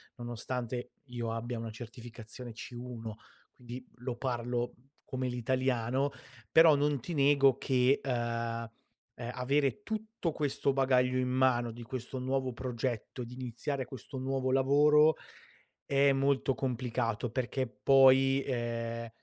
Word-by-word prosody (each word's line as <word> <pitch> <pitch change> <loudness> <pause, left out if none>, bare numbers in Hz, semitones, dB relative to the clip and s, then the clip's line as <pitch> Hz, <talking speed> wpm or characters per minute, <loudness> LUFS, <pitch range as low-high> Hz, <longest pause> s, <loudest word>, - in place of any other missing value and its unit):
nonostante, 120 0 -4
io 120 -3 -4
abbia 115 +1 -3
una 115 - -4
certificazione 115 +1 -9
C1, 120 -1 -7 0.4
quindi 125 +1 -9
lo 125 0 -4
parlo 120 -1 -2 0.3
come 130 0 -3
l'italiano, 130 +2 0 0.4
però 160 -1 +8
non 145 0 +1
ti 170 +9 -6
nego 140 -2 +5
che, 130 0 +3
uhm, 135 - -1 0.5
uhm, 115 - -10 0.6
avere 140 +8 +1
tutto 220 -5 -3
questo 140 -2 0
bagaglio 130 -1 +3
in 125 0 0
mano 125 -2 +2
di 120 +1 -10
questo 125 +2 -5
nuovo 130 0 -1
progetto, 125 0 -3
di 120 +1 -9
iniziare 130 +2 -3
questo 130 +1 -9
nuovo 130 0 -1
lavoro, 150 +3 +5 0.7
è 140 0 +4
molto 135 0 +2
complicato 120 -2 -1
perché, 130 +1 -1
poi, 135 +4 +5
ehm, 115 -2 -3
130 Hz, 120 wpm, -31 LUFS, 120-135 Hz, 0.7 s, però